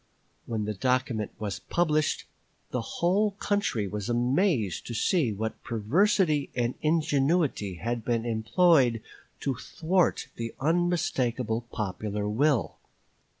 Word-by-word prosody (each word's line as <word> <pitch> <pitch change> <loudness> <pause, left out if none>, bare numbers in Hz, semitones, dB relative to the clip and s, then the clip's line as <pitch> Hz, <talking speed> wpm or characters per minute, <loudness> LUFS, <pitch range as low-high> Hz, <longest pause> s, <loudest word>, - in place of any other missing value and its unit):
When 110 -2 -2
the 105 - -2
document 125 0 0
was 105 -3 -4
published 155 -3 0 0.5
the 125 - -1
whole 195 - +1
country 200 - -1
was 105 +2 -4
amazed 120 - +1
to 120 - -4
see 150 - +2
what 110 +2 -4
perversity 150 - +2
and 120 0 0
ingenuity 150 - +1
had 115 +5 -3
been 115 0 0
employed 120 +1 +3 0.4
to 135 - 0
thwart 170 - 0
the 115 -1 -5
unmistakable 130 -8 0
popular 105 0 -3
will. 115 - +1
125 Hz, 110 wpm, -28 LUFS, 110-160 Hz, 0.5 s, employed